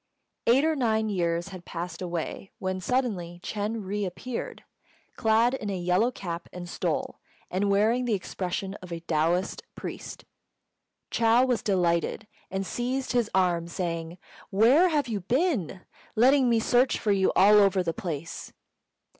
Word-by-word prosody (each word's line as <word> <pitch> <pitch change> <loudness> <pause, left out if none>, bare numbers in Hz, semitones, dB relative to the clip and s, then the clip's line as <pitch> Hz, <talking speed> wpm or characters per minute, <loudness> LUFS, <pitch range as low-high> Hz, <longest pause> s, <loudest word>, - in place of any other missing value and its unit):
Eight 260 +6 +5
or 320 0 +2
nine 220 -5 +1
years 170 -2 -1
had 185 -2 -9
passed 175 0 -6
away 175 +2 -4
when 185 -1 -3
suddenly 185 -7 -1
Ch'êng 215 0 -3
re 205 +2 -2
appeared, 200 +7 -5 0.5
clad 225 +2 +3
in 215 -6 -3
a 195 - -2
yellow 180 +6 +2
cap 175 -8 -6
and 180 -1 -7
stole, - - -2 0.3
and 195 +2 0
wearing 220 +5 +3
the 230 -3 +1
expression 190 0 -4
of 180 -1 -10
a 165 -1 -4
Taoist 170 +3 0
priest. - - -7 0.9
Chou 230 +2 +4
was 250 -3 0
delighted, 175 +1 0 0.2
and 195 0 -2
seized 255 +5 -2
his 240 -3 +1
arm, 175 -3 +2
saying, 170 -1 -4 0.3
"Where 250 - +5
have 295 -4 +1
you 220 -3 -2
been? 235 - 0 0.3
letting 255 +3 +5
me 230 -1 +3
search 245 +3 +3
for 210 - 0
you 195 -1 +3
all 210 +2 +7
over 195 -2 +4
the 165 -1 -1
place." 170 -1 -6
200 Hz, 150 wpm, -27 LUFS, 175-235 Hz, 0.9 s, all